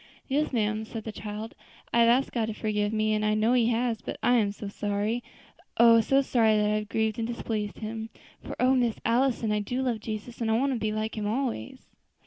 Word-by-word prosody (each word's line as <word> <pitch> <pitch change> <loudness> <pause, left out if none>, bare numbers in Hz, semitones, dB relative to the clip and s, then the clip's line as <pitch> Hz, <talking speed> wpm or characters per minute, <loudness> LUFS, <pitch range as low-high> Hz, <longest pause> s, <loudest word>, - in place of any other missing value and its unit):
'" - - -29
"Yes, 295 +3 0
ma'am," 215 -3 0
said 220 0 -7
the 220 - -5
child; 215 +1 -6 0.4
"I 235 - +4
have 230 0 +6
asked 255 +3 +2
Him 230 -3 0
to 220 - -3
forgive 210 -1 -1
me, 215 0 +1
and 215 0 0
I 215 0 +2
know 220 +3 +2
He 240 -2 +3
has; 235 -1 0
but - - -6
I 245 - +4
am 205 -3 +2
so 205 0 -7
sorry, 205 +4 -2 0.5
oh! 230 -1 +7
so 270 +5 +3
sorry 225 -4 +3
that 210 0 +2
I - - +1
have 210 0 -5
grieved 220 0 0
and 225 - -1
displeased 220 -3 -3
Him; 220 0 -5 0.3
for, - - -8
O 255 +1 +4
Miss 240 -4 +2
Allison! 235 -1 +2
I 210 - +1
do 245 +6 -2
love 240 -4 -1
Jesus, 220 +2 -6
and 225 - 0
want 275 +2 +1
to 240 - -2
be 215 -1 -1
like 215 +1 -3
Him 205 - -2
always." 230 - -3
220 Hz, 235 wpm, -27 LUFS, 215-240 Hz, 0.5 s, oh